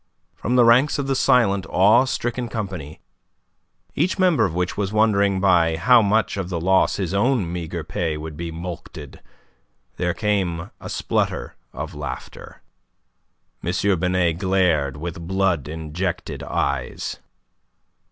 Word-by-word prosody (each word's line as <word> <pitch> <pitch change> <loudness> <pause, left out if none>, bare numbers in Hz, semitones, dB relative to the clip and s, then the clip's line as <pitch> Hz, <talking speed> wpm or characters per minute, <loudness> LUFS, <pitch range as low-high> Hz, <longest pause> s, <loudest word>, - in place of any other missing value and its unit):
From 120 - -2
the 125 -1 +6
ranks 125 +5 +4
of 140 - -2
the 135 - 0
silent, 110 -10 +3
awe 110 +7 +5
stricken 120 -1 -3
company, 95 -10 -6 0.9
each 185 - 0
member 180 - +3
of 85 -4 -3
which 90 0 -1
was 100 -1 -2
wondering 100 -3 +2
by 85 -4 +3
how 125 +6 +5
much 105 0 +1
of 95 -2 -3
the 85 -3 -2
loss 95 +3 +3
his 95 -2 -3
own 105 -4 +1
meagre 85 -1 -4
pay 80 -2 -2
would 75 0 -7
be 85 +1 -5
mulcted, 80 -3 -8 0.8
there 90 -1 -1
came 95 -6 -1
a - - -7
splutter - - -2 0.2
of - - -6
laughter. 75 -3 -8 1.0
M. 90 +2 +1
Binet 90 -2 +1
glared 90 -8 +1
with 85 +1 -6
blood 95 -7 0
injected 80 +3 -4
eyes. 65 -2 -2
90 Hz, 135 wpm, -22 LUFS, 85-105 Hz, 1.0 s, the